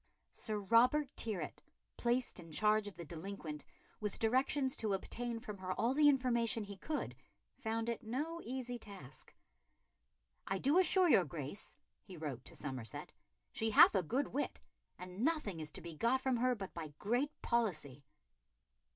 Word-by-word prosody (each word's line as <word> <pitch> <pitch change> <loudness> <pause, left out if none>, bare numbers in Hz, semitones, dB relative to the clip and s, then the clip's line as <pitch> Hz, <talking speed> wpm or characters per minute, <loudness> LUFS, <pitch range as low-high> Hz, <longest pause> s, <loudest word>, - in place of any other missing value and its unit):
Sir 215 -2 -3
Robert 245 +8 +4
Tyrwhitt, 215 -5 -1 0.3
placed 240 -2 0
in 165 -2 -11
charge 210 +4 +3
of 205 - -8
the 170 0 -7
delinquent, 160 -2 -6 0.4
with 210 -2 -3
directions 260 +3 +2
to 215 -3 +1
obtain 235 +4 -4
from 210 -4 -7
her 185 0 -2
all 235 +6 +1
the 295 +1 +6
information 235 -5 +2
he 200 0 -8
could, 300 +10 -3 0.4
found 225 -2 -1
it 235 -1 -2
no 300 +9 -3
easy 245 -1 -4
task. 190 - -11 1.2
"I 195 - 0
do 285 - +4
assure 370 +1 +5
your 195 - +6
Grace," 150 +5 -7 0.2
he 185 - -11
wrote 140 -6 -5
to - - -10
Somerset, 130 -6 -5 0.4
"she 225 - -1
hath 215 - +8
a 195 - +3
good 255 - -1
wit, 285 - -2 0.4
and 180 +1 -9
nothing 295 - 0
is 155 -1 -4
to - - -5
be 170 0 -7
got 235 +11 +2
from 260 -1 +1
her 250 +1 +2
but 195 -4 -7
by 155 -4 -7
great 245 +8 0
policy." 155 - 0
220 Hz, 160 wpm, -36 LUFS, 180-255 Hz, 1.2 s, hath